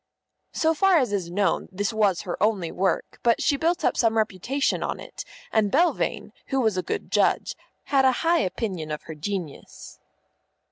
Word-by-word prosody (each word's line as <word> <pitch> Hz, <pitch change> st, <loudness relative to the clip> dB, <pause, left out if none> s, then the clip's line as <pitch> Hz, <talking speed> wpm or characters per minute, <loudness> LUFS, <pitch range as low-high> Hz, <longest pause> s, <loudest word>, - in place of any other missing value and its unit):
_ -, -, -9 dB
So 320 Hz, 0 st, +3 dB
far 385 Hz, +2 st, +4 dB
as 250 Hz, -8 st, +1 dB
is 185 Hz, -4 st, -2 dB
known, 195 Hz, +3 st, 0 dB
this 205 Hz, +3 st, -2 dB
was 205 Hz, -5 st, +2 dB
her 180 Hz, -4 st, -4 dB
only 200 Hz, -6 st, +1 dB
work, 190 Hz, +1 st, -1 dB
but 235 Hz, -1 st, +3 dB
she 285 Hz, -, +2 dB
built 335 Hz, +5 st, 0 dB
up -, -, +2 dB
some 225 Hz, -1 st, +2 dB
reputation 220 Hz, +6 st, 0 dB
on -, -, -3 dB
it, -, -, -8 dB, 0.3 s
and 215 Hz, -3 st, +2 dB
Belvane, 345 Hz, -, +1 dB, 0.2 s
who 270 Hz, -, 0 dB
was 220 Hz, -5 st, +2 dB
a 185 Hz, -, 0 dB
good -, -, -5 dB
judge, -, -, +1 dB, 0.3 s
had 275 Hz, -2 st, +2 dB
a 260 Hz, -, +5 dB
high 335 Hz, +1 st, +4 dB
opinion 185 Hz, -, -3 dB
of 150 Hz, 0 st, -5 dB
her 160 Hz, -, -8 dB
genius. 165 Hz, -1 st, -6 dB
215 Hz, 185 wpm, -25 LUFS, 185-270 Hz, 0.3 s, a